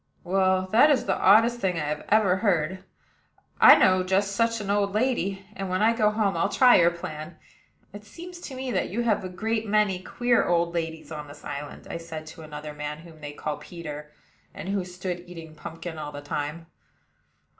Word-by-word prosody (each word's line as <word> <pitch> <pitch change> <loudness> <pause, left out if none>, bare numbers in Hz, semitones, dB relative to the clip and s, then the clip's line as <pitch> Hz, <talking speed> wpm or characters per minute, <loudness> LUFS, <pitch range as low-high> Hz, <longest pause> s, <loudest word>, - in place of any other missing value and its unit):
"Well, 185 0 +2
that 240 +7 +6
is 280 -4 +2
the 190 - +1
oddest 230 +5 +5
thing 185 -5 0
I 150 0 -3
ever 205 -3 +4
heard. 185 -2 0 0.8
I - - +10
know 185 0 +4
just 190 +2 +1
such 230 0 +1
an 200 -1 -3
old 200 -1 +1
lady, 200 -5 0
and 195 -1 -4
when 185 +3 0
I 225 +1 +5
go 215 -2 +3
home 210 -3 0
I'll 170 +4 +1
try 250 +3 +6
your 170 -1 +5
plan. 160 -1 -7 0.6
It 205 0 -9
seems 345 - -10
to 275 -6 -8
me 260 0 -4
that - - -1
you 235 +6 -2
have 215 -4 +1
a 185 - -5
great 220 +4 -2
many 205 -3 +2
queer 240 +5 +1
old 170 0 +1
ladies 160 -2 -4
on 150 -1 -6
this 145 +1 -13
island," 145 +1 -7
I - - -5
said 165 -2 -8
to 160 +1 -11
another 150 -1 -8
man, 150 0 -5
whom 160 -1 -15
they 145 0 -7
called 150 0 -5
Peter, 150 -3 -8 0.4
and 185 - -6
who 200 -1 0
stood 180 0 -5
eating 165 -3 -10
pumpkin 165 +1 -8
all 150 -1 -5
the 145 - -8
time. 145 +3 -4
185 Hz, 200 wpm, -26 LUFS, 160-210 Hz, 0.8 s, I